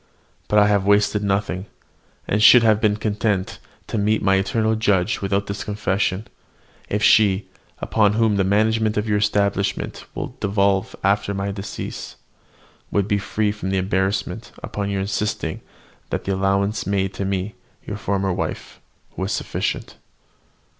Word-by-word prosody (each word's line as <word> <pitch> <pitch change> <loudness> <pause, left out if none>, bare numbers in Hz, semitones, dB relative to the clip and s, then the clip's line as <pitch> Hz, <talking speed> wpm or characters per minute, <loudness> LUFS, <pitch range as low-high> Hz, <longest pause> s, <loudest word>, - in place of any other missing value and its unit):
But 105 - +2
I 105 - +7
have 100 -2 +2
wasted 105 0 +3
nothing, 100 -1 -1 0.6
and 105 - +1
should 120 +2 +8
have 110 -1 +4
been 105 -2 +3
content 105 -2 -1 0.3
to 110 - -3
meet 105 +2 +1
my 95 - +4
eternal 110 +3 +1
Judge 105 +1 +1
without 100 0 0
this 100 +1 -4
confession, 100 0 -1 0.6
if 105 +1 -1
she, 105 -2 +4 0.3
upon 105 -2 +2
whom 110 -1 +2
the 100 - +2
management 110 +2 +2
of 105 +1 0
your 105 -1 +2
establishment 100 -1 0
will - - -5
devolve 100 -1 +1
after 100 +1 +1
my 100 +1 -2
decease, 100 0 -6 0.7
would 100 -1 0
be 100 -2 +1
free 105 +1 -1
from 95 -2 -4
embarrassment 95 +4 -1
upon 100 -1 -3
your 100 -1 -1
insisting 105 +2 -2 0.5
that - - -2
the 100 - -1
allowance 100 +2 0
made 95 -1 0
to 95 - -4
me, 95 +1 -2 0.3
your 105 - -5
former 100 -2 -1
wife, - - -5 0.3
was 95 +2 -3
sufficient." - - -3
100 Hz, 145 wpm, -22 LUFS, 95-105 Hz, 0.7 s, should